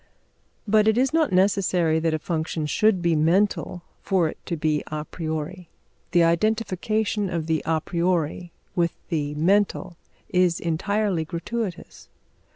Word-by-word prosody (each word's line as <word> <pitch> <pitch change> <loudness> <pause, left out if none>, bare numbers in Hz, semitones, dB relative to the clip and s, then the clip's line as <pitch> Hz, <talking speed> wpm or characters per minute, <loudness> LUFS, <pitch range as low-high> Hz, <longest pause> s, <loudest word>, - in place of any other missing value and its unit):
But 215 +1 +4
it 220 +1 +3
is 265 +3 +2
not 320 -7 +2
necessary 185 -4 +2
that 165 0 0
a - - 0
function 160 -1 -3
should 190 +4 +2
be 170 -1 +3
mental 175 +2 +1 0.2
for 185 -4 +1
it - - -9
to 170 - -2
be 155 -1 0
a 150 0 -4
priori. 160 +2 -5 0.4
The 175 0 +4
identification 215 +3 0
of 170 -3 -2
the 160 -1 0
a 160 -1 +2
priori 175 0 -1 0.2
with 170 -2 +1 0.2
the 150 -2 -2
mental 185 +1 +1 0.3
is 180 -2 +2
entirely 190 +2 0
gratuitous. 180 +4 -5
175 Hz, 140 wpm, -24 LUFS, 160-200 Hz, 0.4 s, But